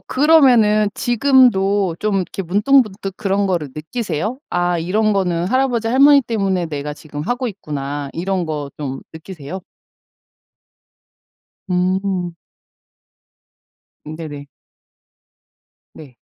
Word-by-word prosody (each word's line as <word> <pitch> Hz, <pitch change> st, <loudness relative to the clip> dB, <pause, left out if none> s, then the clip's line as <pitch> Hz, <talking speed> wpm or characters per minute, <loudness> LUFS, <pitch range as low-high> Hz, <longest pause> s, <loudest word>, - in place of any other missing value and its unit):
그러면은 250 Hz, -8 st, +4 dB
지금도 210 Hz, -8 st, +2 dB
좀 210 Hz, -2 st, 0 dB
이렇게 190 Hz, +1 st, -3 dB
문득문득 205 Hz, 0 st, +1 dB
그런 200 Hz, 0 st, 0 dB
거를 170 Hz, -7 st, -2 dB
느끼세요? 195 Hz, -, -4 dB
'아 175 Hz, 0 st, 0 dB
이런거는 185 Hz, -2 st, 0 dB
할아버지. 245 Hz, -1 st, 0 dB
할머니 280 Hz, +3 st, +6 dB
때문에 195 Hz, -7 st, -1 dB
내가 150 Hz, -1 st, -5 dB
지금 150 Hz, -1 st, -8 dB
하고 245 Hz, -, -2 dB
있구나.' 145 Hz, -6 st, -5 dB
이런 185 Hz, +1 st, -2 dB
거 150 Hz, -3 st, -4 dB
좀 135 Hz, -3 st, -5 dB
느끼세요? 165 Hz, +1 st, -8 dB, 2.1 s
음. 180 Hz, -1 st, -1 dB, 1.7 s
음 155 Hz, +1 st, -7 dB
네네. 145 Hz, -3 st, -8 dB, 1.5 s
네. 135 Hz, -6 st, -14 dB
190 Hz, 220 characters per minute, -19 LUFS, 160-220 Hz, 2.1 s, 할머니